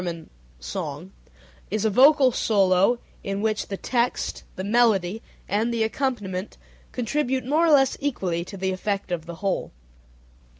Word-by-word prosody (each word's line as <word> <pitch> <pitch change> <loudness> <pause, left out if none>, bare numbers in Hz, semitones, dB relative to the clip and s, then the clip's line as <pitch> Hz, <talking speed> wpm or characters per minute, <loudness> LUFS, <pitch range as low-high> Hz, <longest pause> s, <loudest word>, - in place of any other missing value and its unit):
= - - -30
song) 145 - -6 0.6
is 215 0 -1
a - - +4
vocal 265 +3 +6
solo 195 0 +3 0.3
in 195 0 -3
which 215 0 -1
the 195 - -4
text, 240 +2 -1
the 185 - -5
melody, 215 -2 +2 0.3
and 220 +4 0
the 230 -1 +1
accompaniment 220 -6 -3 0.3
contribute 260 +1 -1
more 310 +6 +3
or - - +4
less 270 -3 +5
equally 185 -12 -2
to 195 +3 -9
the 190 0 -1
effect 195 0 -3
of 170 -2 -3
the 170 - -6
whole. 195 - -1
210 Hz, 145 wpm, -24 LUFS, 185-245 Hz, 0.6 s, vocal